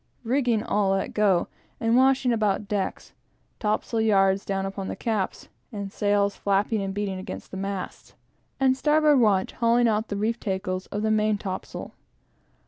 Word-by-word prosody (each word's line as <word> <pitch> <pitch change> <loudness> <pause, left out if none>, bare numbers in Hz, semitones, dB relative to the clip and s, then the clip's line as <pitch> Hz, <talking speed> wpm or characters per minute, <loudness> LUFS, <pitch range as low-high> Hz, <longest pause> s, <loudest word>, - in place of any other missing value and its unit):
Rigging 240 -3 +1
all 205 -4 +1
let 195 - -2
go, 200 -5 +2 0.3
and 225 +1 +2
washing 260 -1 +4
about 210 -2 0
decks; 200 -2 -3 0.5
topsail 215 +1 0
yards 195 -3 +3
down 195 -1 -2
upon 195 0 -5
the - - -4
caps, 215 -5 -2 0.2
and 200 -2 -5
sails 205 0 +1
flapping 200 +2 0
and 195 0 -3
beating 195 -1 -3
against 185 - -8
the 190 - -6
masts; 195 -1 -5 0.4
and 260 -1 +3
starboard 300 0 +4
watch 200 -5 +3
hauling 235 0 +2
out 220 0 0
the 205 - -3
reef 225 +3 -1
tackles 190 -2 -3
of 205 +1 -4
the 220 - +1
main 215 -1 +2
topsail. 190 -2 -6
210 Hz, 160 wpm, -25 LUFS, 195-230 Hz, 0.5 s, washing